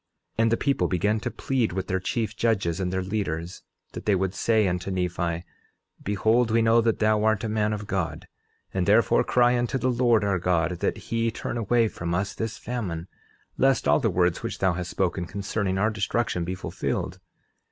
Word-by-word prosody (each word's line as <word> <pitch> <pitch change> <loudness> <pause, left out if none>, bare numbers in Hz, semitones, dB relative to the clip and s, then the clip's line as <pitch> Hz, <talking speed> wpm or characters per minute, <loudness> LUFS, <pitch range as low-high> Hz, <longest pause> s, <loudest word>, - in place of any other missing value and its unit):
11:8 - - +5
And 115 - +2
the 115 - +3
people 140 -1 +1
began 105 +4 +1
to 120 +3 -3
plead 120 -6 -1
with 95 0 -2
their 95 0 -1
chief 110 +4 -2
judges 100 -7 0
and 90 -1 -1
their 95 0 -1
leaders, 90 -4 -3 0.3
that - - -8
they 105 - +4
would 95 0 -1
say 110 -2 +2
unto 90 +1 -2
Nephi: 85 -2 -1 0.6
Behold, 110 +4 +2
we 115 +1 +3
know 115 +1 +5
that 115 -1 +1
thou 110 -1 +2
art 110 0 +2
a - - -1
man 105 0 0
of 105 -1 -3
God, 95 -5 -3 0.5
and 95 -2 0
therefore 105 -1 +4
cry 120 0 +3
unto 120 +2 0
the 130 0 +1
Lord 120 -3 +3
our 100 -3 +1
God 85 -1 0
that - - 0
he 115 0 +1
turn 110 - -5
away 115 0 +2
from 85 -4 -3
us 100 +3 -1
this 115 -1 -4
famine, 95 -9 -4 0.5
lest 135 -1 +3
all - - +5
the 120 -6 +1
words 90 -2 +1
which - - -4
thou 95 -2 +2
hast 90 0 -4
spoken 90 -1 -1
concerning 100 -1 -2
our 110 +3 +2
destruction 105 -2 -1
be 90 +2 -3
fulfilled. - - -3
105 Hz, 200 wpm, -26 LUFS, 90-115 Hz, 0.6 s, 11:8